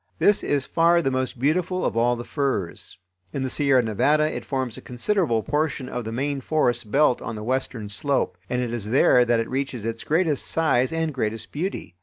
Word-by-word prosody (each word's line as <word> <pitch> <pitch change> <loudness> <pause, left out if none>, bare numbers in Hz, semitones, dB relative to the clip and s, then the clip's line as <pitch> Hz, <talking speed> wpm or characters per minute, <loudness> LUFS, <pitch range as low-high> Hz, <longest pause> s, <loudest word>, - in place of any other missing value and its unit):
This 205 - +3
is 140 -2 0
far 170 +1 +3
the 135 - +1
most 130 -1 -2
beautiful 175 +7 0
of - - -1
all 120 +1 +3
the 120 - -6
firs. 130 - -3 0.4
In 135 - -2
the 130 - -2
Sierra 140 -4 +3
Nevada 145 +8 +2
it - - -4
forms 130 -4 -2
a - - -9
considerable 125 - 0
portion 145 -2 -1
of 120 -2 -4
the 110 - -4
main 140 +3 -2
forest 120 -6 0
belt 140 0 +3
on 115 - -5
the 105 - -6
western 125 -2 -2
slope, 140 +7 -1
and 125 0 0
it 120 -1 -3
is 110 -3 -3
there 125 0 +5
that 120 -1 +2
it 115 - -1
reaches 130 -4 -3
its 115 0 -3
greatest 160 -2 +1
size 145 -4 +2
and 165 -1 -1
greatest 110 -4 -3
beauty. 165 - -4
130 Hz, 205 wpm, -24 LUFS, 120-150 Hz, 0.4 s, there